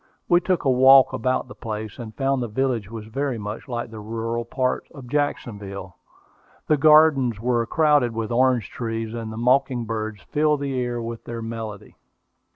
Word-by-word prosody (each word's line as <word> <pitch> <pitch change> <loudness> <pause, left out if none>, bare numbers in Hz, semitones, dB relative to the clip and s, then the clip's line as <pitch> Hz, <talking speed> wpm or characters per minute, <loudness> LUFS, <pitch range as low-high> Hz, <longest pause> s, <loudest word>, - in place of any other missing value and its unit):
We 175 -1 +4
took 185 -3 0
a - - +4
walk 130 +1 +7
about 130 +3 -1
the 130 - -10
place, 110 -1 -6
and 110 -2 -8
found 135 -1 +1
the 120 - -2
village 115 -2 -1
was 110 -2 -7
very 135 +3 -2
much 105 +4 -6
like 120 -2 -4
the 110 - -8
rural 115 +2 -3
part 130 +1 -1
of 135 -3 -10
Jacksonville. 100 - -3 0.7
The 155 - +3
gardens 150 -6 +5
were 120 0 +1
crowded 150 -5 +3
with 115 0 -3
orange 125 -3 +2
trees, 115 -1 -4
and 115 -2 -5
the 110 - -7
mocking 125 0 +2
birds 110 -3 -4
filled 150 - +1
the 140 -1 -2
air 120 -1 -2
with 115 0 -6
their 115 -1 -5
melody. 110 -3 -7
120 Hz, 175 wpm, -23 LUFS, 110-135 Hz, 0.7 s, walk